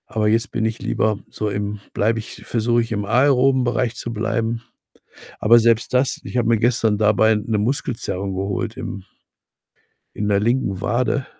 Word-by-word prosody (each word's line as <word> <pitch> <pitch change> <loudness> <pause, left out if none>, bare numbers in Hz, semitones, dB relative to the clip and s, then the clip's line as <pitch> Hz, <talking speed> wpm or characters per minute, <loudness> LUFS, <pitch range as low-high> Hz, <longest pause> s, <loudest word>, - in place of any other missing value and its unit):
Aber 110 -1 0
jetzt 115 +4 +1
bin 110 - -1
ich 110 +1 -2
lieber 110 -2 0
so 105 - -3
im 105 +1 -3
bleibe 110 +2 +1
ich 110 - -10
versuche 120 +1 +1
ich, 115 - -5
im 105 -2 -2
aeroben 130 +3 +3
Bereich 120 -1 0
zu 120 - -5
bleiben. 115 +1 -1 0.8
Aber 115 +2 +6
selbst 115 +1 +2
das 130 +1 +1
ich - - -5
habe 120 - +1
mir 115 0 +4
gestern 115 -2 +2
dabei 110 +1 +3
'ne 105 +1 -1
Muskelzerrung 105 -4 -2
geholt 100 +4 -3
im 100 -5 -6 1.1
in 105 - -3
der 100 -1 +3
linken 105 -3 0
Wade. 130 +4 0
115 Hz, 170 wpm, -21 LUFS, 105-120 Hz, 1.1 s, Aber